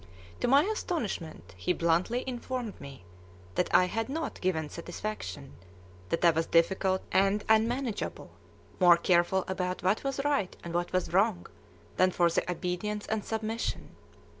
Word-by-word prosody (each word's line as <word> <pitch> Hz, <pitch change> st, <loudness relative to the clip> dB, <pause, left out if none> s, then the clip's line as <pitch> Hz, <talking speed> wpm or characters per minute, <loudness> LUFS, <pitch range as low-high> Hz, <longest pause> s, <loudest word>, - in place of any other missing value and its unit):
To -, -, 0 dB
my 275 Hz, +4 st, +6 dB
astonishment 225 Hz, -, -3 dB
he 90 Hz, -, 0 dB
bluntly 175 Hz, +10 st, +1 dB
informed 250 Hz, -3 st, -5 dB
me 135 Hz, -8 st, -11 dB, 0.5 s
that 180 Hz, -, 0 dB
I 180 Hz, -, +6 dB
had 225 Hz, +6 st, -2 dB
not 315 Hz, +1 st, -4 dB
given 160 Hz, -4 st, 0 dB
satisfaction, 170 Hz, -4 st, -6 dB, 0.6 s
that 165 Hz, -, +1 dB
I 170 Hz, -, +8 dB
was 165 Hz, +1 st, -1 dB
"difficult" 190 Hz, +3 st, +2 dB
and 195 Hz, +2 st, +3 dB
unmanageable, 230 Hz, +1 st, 0 dB, 0.5 s
"more 175 Hz, -2 st, +7 dB
careful 175 Hz, +2 st, +2 dB
about 185 Hz, -1 st, -3 dB
what 190 Hz, +4 st, +1 dB
was 275 Hz, 0 st, -2 dB
right 280 Hz, -11 st, 0 dB
and 170 Hz, -, -6 dB
what 175 Hz, 0 st, -1 dB
was 185 Hz, -2 st, -1 dB
wrong 195 Hz, -1 st, +2 dB, 0.5 s
than 185 Hz, -, +5 dB
for 175 Hz, -2 st, +2 dB
the 170 Hz, -, -1 dB
obedience 180 Hz, +4 st, -3 dB
and 215 Hz, -1 st, -2 dB
submission." 225 Hz, +1 st, -3 dB
190 Hz, 145 wpm, -29 LUFS, 175-225 Hz, 0.6 s, I